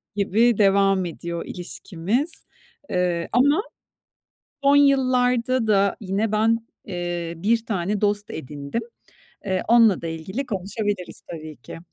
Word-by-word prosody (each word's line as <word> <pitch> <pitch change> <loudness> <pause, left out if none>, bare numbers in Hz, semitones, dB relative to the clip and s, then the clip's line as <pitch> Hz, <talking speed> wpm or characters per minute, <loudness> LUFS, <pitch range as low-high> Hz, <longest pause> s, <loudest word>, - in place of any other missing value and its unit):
gibi 215 +3 +3
devam 195 -2 +4
ediyor 170 0 -5
ilişkimiz. 190 - -3 0.6
Eee, 175 -2 0
ama 285 - +4 1.0
son 280 +1 +5
yıllarda 255 -3 +3
da 200 -2 +3
yine 205 +2 -1
ben, 225 +1 +2 0.2
eee, 175 -2 -3
1 225 +6 +1
tane 200 0 -1
dost 205 0 0
edindim. 145 - -5 0.6
Eee, 185 -2 -1
onunla 230 -6 +5
da - - -3
ilgili 190 +11 -4
konuşabiliriz 205 -1 -3
tabii 155 -2 -8
ki. 130 - -10
200 Hz, 115 wpm, -23 LUFS, 175-230 Hz, 1.0 s, son